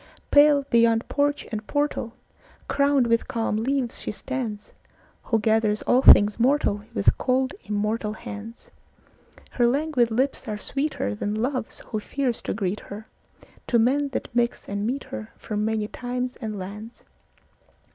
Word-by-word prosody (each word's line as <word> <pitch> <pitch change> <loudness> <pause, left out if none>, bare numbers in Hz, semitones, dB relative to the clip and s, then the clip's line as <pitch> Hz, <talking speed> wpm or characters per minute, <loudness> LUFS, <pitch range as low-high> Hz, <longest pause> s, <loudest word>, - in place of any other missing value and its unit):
Pale, 290 -1 +6
beyond 230 -1 +3
porch 290 0 0
and 215 -1 -5
portal, 290 -5 -1 0.5
Crowned 280 -2 +3
with 230 0 +1
calm 225 -2 -1
leaves, 250 +1 -1
she - - -5
standsWho 225 -1 -5
gathers 220 -1 +1
all 250 - +3
things 205 -5 +7
mortalWith 230 -5 +1
cold 260 +1 +1
immortal 210 +1 -1
hands; 220 +1 -9 0.8
Her 240 -1 +2
languid 270 -2 +1
lips 260 +3 -1
are 210 -1 -3
sweeterThan 210 - -2
love's 250 +1 -2
who 215 - -4
fears 250 +2 -2
to - - -3
greet 200 -1 -2
herTo 220 +3 -5
men 275 +5 +2
that 270 - -4
mix 240 0 0
and 200 +1 -2
meet 270 +3 -2
herFrom 110 - -6
many 215 0 0
times 250 +2 -4
and 215 -3 -5
lands. 210 +5 -8
230 Hz, 130 wpm, -25 LUFS, 210-265 Hz, 0.8 s, things